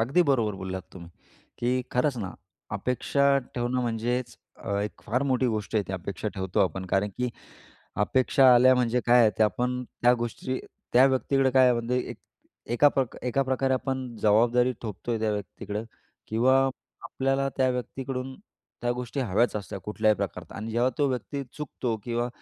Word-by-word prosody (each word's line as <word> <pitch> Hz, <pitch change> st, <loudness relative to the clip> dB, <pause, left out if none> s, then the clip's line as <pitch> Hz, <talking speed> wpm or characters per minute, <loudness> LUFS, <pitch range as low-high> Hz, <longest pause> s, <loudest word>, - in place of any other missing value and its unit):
अगदी 135 Hz, +10 st, +3 dB
बरोबर 115 Hz, -6 st, +1 dB
बोललात 95 Hz, 0 st, -4 dB
तुम्ही. 85 Hz, -2 st, -11 dB, 0.5 s
की 125 Hz, +1 st, 0 dB
खरंच 125 Hz, +2 st, +1 dB
ना 95 Hz, -4 st, -4 dB, 0.4 s
अपेक्षा 140 Hz, +6 st, +2 dB, 0.2 s
ठेवणं 120 Hz, +1 st, -1 dB
म्हणजेच 120 Hz, +1 st, -2 dB, 0.2 s
अ, -, -, -7 dB
एक 105 Hz, 0 st, -5 dB
फार 125 Hz, +5 st, 0 dB
मोठी 130 Hz, 0 st, +2 dB
गोष्ट 110 Hz, -1 st, -3 dB
आहे 105 Hz, -, +3 dB
ती -, -, -3 dB
अपेक्षा 95 Hz, +2 st, -4 dB
ठेवतो 95 Hz, +1 st, -1 dB
आपण 95 Hz, -1 st, 0 dB
कारण 95 Hz, +3 st, +1 dB
की 125 Hz, 0 st, 0 dB, 0.8 s
अपेक्षा 130 Hz, +3 st, +3 dB
आल्या 130 Hz, +2 st, +7 dB
म्हणजे 125 Hz, -1 st, +1 dB
काय 120 Hz, 0 st, +6 dB
आहे? 110 Hz, -, +6 dB
ते 110 Hz, -, +5 dB
आपण 125 Hz, +4 st, 0 dB, 0.2 s
त्या 120 Hz, +1 st, +6 dB
गोष्टी 120 Hz, +2 st, -3 dB, 0.3 s
त्या 125 Hz, +2 st, +7 dB
व्यक्तीकडे 135 Hz, 0 st, +2 dB
काय 130 Hz, 0 st, +5 dB
आहे 125 Hz, -, +5 dB
म्हणजे 120 Hz, +1 st, -1 dB
एक -, -, -7 dB, 0.6 s
एकाप 140 Hz, +2 st, +4 dB, 0.3 s
एकाप्रकारे 130 Hz, +1 st, +1 dB
आपण 130 Hz, 0 st, -2 dB, 0.2 s
जबाबदारी 120 Hz, +4 st, +4 dB
थोपतोय 110 Hz, +1 st, -4 dB
त्या 110 Hz, -1 st, 0 dB
व्यक्तीकडं 105 Hz, +1 st, -5 dB, 0.4 s
किंवा 120 Hz, +4 st, +3 dB, 0.5 s
आपल्याला 135 Hz, +1 st, 0 dB
त्या 130 Hz, -1 st, +3 dB
व्यक्तीकडून 130 Hz, +1 st, -4 dB, 0.5 s
त्या 120 Hz, -, +1 dB
गोष्टी 125 Hz, +2 st, -4 dB
हव्याच 120 Hz, -1 st, +1 dB
असत्या 100 Hz, -1 st, -5 dB
कुठल्याही 105 Hz, +2 st, +1 dB
प्रकारात 90 Hz, -4 st, -5 dB
आणि 110 Hz, +2 st, -5 dB
जेव्हा 120 Hz, +3 st, +2 dB
तो 145 Hz, -, +3 dB
व्यक्ती 140 Hz, +2 st, -3 dB
चुकतो 130 Hz, -5 st, -3 dB
किंवा 120 Hz, 0 st, -1 dB
120 Hz, 160 wpm, -27 LUFS, 110-130 Hz, 0.8 s, आल्या